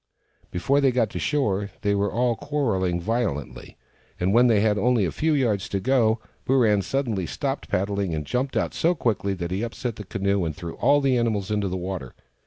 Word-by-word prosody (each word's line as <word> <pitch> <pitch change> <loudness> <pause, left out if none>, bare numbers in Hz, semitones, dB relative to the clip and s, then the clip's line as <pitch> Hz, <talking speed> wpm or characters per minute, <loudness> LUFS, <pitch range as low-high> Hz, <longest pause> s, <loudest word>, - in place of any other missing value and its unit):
Before 140 +11 +1
they 135 -2 +4
got 120 -4 +1
to - - -4
shore, 105 -9 0
they 100 - +2
were 100 -1 0
all 120 +2 +1
quarrelling 110 -12 -1
violently, 105 - -3 0.4
and 90 +2 +1
when 120 +2 +6
they 110 -4 +4
had 105 -1 +2
only 120 -1 +3
a 85 - -1
few 160 +1 0
yards 110 -8 0
to 100 - -1
go 115 -1 +2 0.3
Booran 115 -6 +4
suddenly 115 -10 -1
stopped - - -3
paddling, 100 -1 -1
and 75 -1 -4
jumped 130 - -1
out - - 0
so 175 +2 +2
quickly 105 - 0
that 85 -1 -4
he 95 +2 -1
upset 115 0 -4
the 105 - -6
canoe, 100 0 0
and 80 -2 -3
threw 85 -3 -6
all 145 +3 +4
the 135 -2 +2
animals 105 -4 -1
into 105 -2 0
the 95 0 -2
water. 90 -8 -5
105 Hz, 200 wpm, -24 LUFS, 95-125 Hz, 0.4 s, when